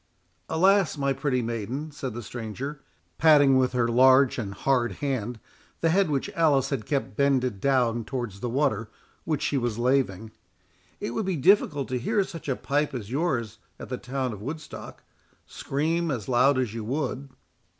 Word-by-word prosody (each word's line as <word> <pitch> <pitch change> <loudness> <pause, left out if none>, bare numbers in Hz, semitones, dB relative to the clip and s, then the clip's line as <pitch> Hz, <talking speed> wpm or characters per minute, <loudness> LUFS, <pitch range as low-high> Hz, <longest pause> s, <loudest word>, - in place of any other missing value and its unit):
"Alas! 190 +1 +3
my 140 -1 +1
pretty 135 -2 -1
maiden," 120 +7 -4
said 130 -5 -6
the 120 - -5
stranger, 125 +6 -6 0.4
patting 145 -4 +6
with 130 -1 +2
her 120 -2 +2
large 130 +2 +5
and 100 -3 -4
hard 120 -2 +1
hand 125 -3 -3 0.4
the 165 - +3
head 190 -1 +3
which 140 -3 -1
Alice 145 -5 +2
had 120 -7 -3
kept 140 -2 -2
bended 130 -6 +1
down 120 -4 +2
towards 120 -4 -5
the 120 - -3
water 115 -4 0 0.4
which 155 -3 -1
she 140 - +1
was 120 -3 -2
laving, 120 -5 0 0.7
"it - - -3
would 190 - -2
be 190 - 0
difficult 150 -4 +3
to 125 -1 -2
hear 205 - +1
such 165 -6 -8
a 130 - +1
pipe 145 +1 -1
as 110 -3 -6
yours 130 -8 -1 0.2
at - - -8
the 125 - -3
town 130 -1 -3
of 100 - -9
Woodstock, 150 +6 -8 0.4
scream 165 +4 -1
as 120 -8 -3
loud 130 +2 +4
as 125 -5 -1
you 115 -1 -5
would." 135 +2 -3
130 Hz, 170 wpm, -26 LUFS, 120-145 Hz, 0.7 s, patting